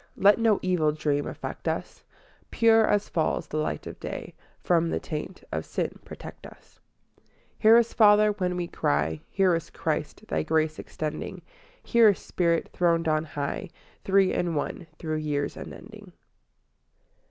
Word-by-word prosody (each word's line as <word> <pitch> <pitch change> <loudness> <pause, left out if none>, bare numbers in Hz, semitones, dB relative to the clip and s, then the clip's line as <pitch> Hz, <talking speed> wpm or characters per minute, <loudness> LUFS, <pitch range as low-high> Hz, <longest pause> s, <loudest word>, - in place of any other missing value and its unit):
Let 200 +3 +5
no 225 -3 +4
evil 175 -5 +2
dream 145 -1 -1
affect - - -6
us; - - -3 0.5
Pure 225 -1 +4
as 205 0 +1
falls 160 -2 -1
the 155 - -5
light 155 - -2
of - - -8
day, - - -6 0.3
From 170 -1 +2
the - - -1
taint 155 +4 -6
of - - -2
sin - - -3
protect - - -10
us. - - -19 0.4
III - - -39 0.3
Hear 225 +1 +7
us, 235 -1 +2
Father, 210 -1 +6
when 180 -3 -2
we 175 -1 -2
cry; 75 - 0
Hear 190 -3 +3
us, 165 -1 -2
Christ, - - -3
Thy 80 - 0
grace 155 - 0
extending; 155 +4 -5 0.4
Hear 230 -2 +5
us, 200 - +1
Spirit, 170 -2 0
throned 170 -2 +2
on 155 0 +1
high, 145 +5 -4 0.3
Three 195 -1 +3
in 170 -2 -1
one, 160 +3 -3
through 155 -1 -3
years 150 -2 -2
unending. 210 -1 -10
170 Hz, 155 wpm, -27 LUFS, 155-205 Hz, 0.5 s, Hear